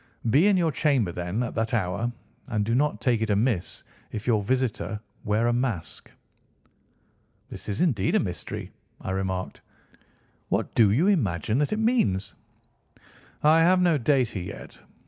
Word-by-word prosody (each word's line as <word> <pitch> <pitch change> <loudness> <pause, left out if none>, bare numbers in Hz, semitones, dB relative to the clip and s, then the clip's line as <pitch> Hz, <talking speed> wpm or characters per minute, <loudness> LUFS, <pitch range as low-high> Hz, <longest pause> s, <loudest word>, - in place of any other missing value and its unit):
Be 155 - +5
in 200 -2 +4
your 165 -3 +2
chamber 135 - +1
then 90 +7 -2
at 120 - -4
that 115 +1 -1
hour, 100 +3 -1 0.4
and 105 -2 -1
do 115 - 0
not 145 +4 +1
take 120 -4 +1
it 110 - -1
amiss 105 -2 0 0.3
if 105 -1 -5
your 110 -4 +2
visitor 110 -4 -1 0.3
wear 105 +3 +1
a 120 - +2
mask." 120 -8 -3 1.4
"This - - -8
is 100 - -2
indeed 110 - +1
a - - +5
mystery," 90 -5 -5 0.3
I - - -5
remarked. 95 -1 -3 0.9
"What - - -1
do 110 -3 +5
you 130 - +2
imagine 110 - +1
that 145 - 0
it 215 - 0
means?" 220 - +1 1.1
"I 155 +2 +6
have 180 +3 +5
no 175 -4 +3
data 125 -5 +1
yet. 90 - -9
115 Hz, 155 wpm, -26 LUFS, 100-145 Hz, 1.4 s, I